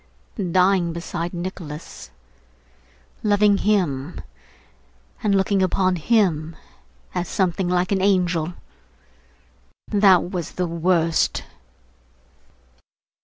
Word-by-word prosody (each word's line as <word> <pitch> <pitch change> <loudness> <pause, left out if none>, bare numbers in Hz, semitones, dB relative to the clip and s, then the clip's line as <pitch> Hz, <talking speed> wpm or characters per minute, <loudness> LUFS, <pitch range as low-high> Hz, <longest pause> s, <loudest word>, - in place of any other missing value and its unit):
Dying 180 -2 +2
beside 170 0 -4
Nicholas, 170 -4 -7 1.1
loving 205 -1 +3
him, 170 -8 0 1.0
and 205 -3 +2
looking 195 0 +2
upon 185 0 +1
him 165 -5 +1 0.6
as 180 -1 -2
something 185 0 0
like 180 +1 0
an 195 -1 +1
angel. 180 -4 +1 1.4
That 195 -4 +4
was 175 -5 -4
the 180 - -1
worst! 165 -1 +1
180 Hz, 80 wpm, -22 LUFS, 170-195 Hz, 1.4 s, That